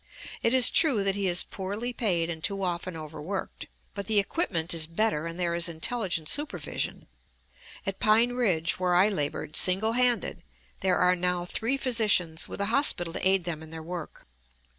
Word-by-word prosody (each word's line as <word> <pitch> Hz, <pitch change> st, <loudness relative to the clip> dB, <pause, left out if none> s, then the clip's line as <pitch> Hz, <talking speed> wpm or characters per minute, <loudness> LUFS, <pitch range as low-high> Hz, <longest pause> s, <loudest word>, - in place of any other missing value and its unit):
It 230 Hz, -, +1 dB
is 255 Hz, -1 st, +7 dB
true 270 Hz, -, +2 dB
that 195 Hz, 0 st, +2 dB
he 200 Hz, -1 st, -1 dB
is 175 Hz, 0 st, +3 dB
poorly 205 Hz, +6 st, -5 dB
paid 175 Hz, -8 st, 0 dB
and 160 Hz, -1 st, -8 dB
too 195 Hz, -1 st, -1 dB
often 175 Hz, -1 st, -3 dB
overworked; 155 Hz, +5 st, -6 dB, 0.3 s
but 200 Hz, -2 st, -6 dB
the 220 Hz, -, +1 dB
equipment 195 Hz, -, 0 dB
is 160 Hz, -2 st, 0 dB
better 165 Hz, -2 st, -1 dB
and 165 Hz, +1 st, -7 dB
there 175 Hz, -1 st, 0 dB
is 170 Hz, 0 st, 0 dB
intelligent 170 Hz, -1 st, -2 dB
supervision. 295 Hz, -, -3 dB, 0.8 s
At 195 Hz, -1 st, -3 dB
Pine 225 Hz, +3 st, +4 dB
Ridge, 185 Hz, -11 st, 0 dB
where 180 Hz, -1 st, +1 dB
I 190 Hz, +4 st, +5 dB
labored 150 Hz, -4 st, -3 dB
single 195 Hz, +5 st, +4 dB
handed, 240 Hz, -7 st, +1 dB, 0.4 s
there 185 Hz, -1 st, +1 dB
are 180 Hz, 0 st, +3 dB
now 180 Hz, 0 st, 0 dB
three 230 Hz, +8 st, -2 dB
physicians, 210 Hz, -11 st, +1 dB
with -, -, -8 dB
a 200 Hz, -, 0 dB
hospital 175 Hz, -, +2 dB
to -, -, 0 dB
aid 190 Hz, -1 st, +2 dB
them 165 Hz, -3 st, -5 dB
in 160 Hz, -, -11 dB
their 160 Hz, 0 st, -8 dB
work. 170 Hz, -1 st, -8 dB
185 Hz, 180 wpm, -27 LUFS, 170-220 Hz, 0.8 s, is